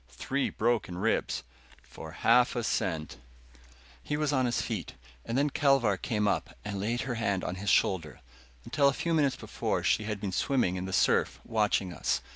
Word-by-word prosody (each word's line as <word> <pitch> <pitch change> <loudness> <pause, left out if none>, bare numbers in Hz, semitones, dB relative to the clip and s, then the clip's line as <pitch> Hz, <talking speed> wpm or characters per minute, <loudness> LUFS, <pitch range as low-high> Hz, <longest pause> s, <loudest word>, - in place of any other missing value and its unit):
Three 135 - -2
broken 110 -6 0
ribs!" 110 +5 0 0.4
"For 80 0 -10
half 125 +1 +5
a 120 - -1
cent 80 - -2 0.4
" - - -25 0.3
He 150 - -2
was 150 -1 0
on 130 -2 +2
his 120 - 0
feet, 110 -7 -4 0.3
and 115 - -2
then 145 +1 +2
Kelvar 135 -9 +3
came 105 +2 -1
up - - -1
and 100 -1 -3
laid 115 +5 -1
her 135 - -3
hand 100 -4 0
on 90 - -2
his 100 - -1
shoulder. 85 -5 +1 0.5
Until 140 -2 +3
a 140 - +3
few 170 +4 -1
minutes 145 -4 +2
before - - -3
she 110 - +2
had 105 -1 -3
been 100 -2 -3
swimming 110 -3 +1
in 90 0 -3
the 95 - -5
surf, 90 - +2
watching 105 -4 0
us. 75 - 0
110 Hz, 190 wpm, -29 LUFS, 95-130 Hz, 0.5 s, half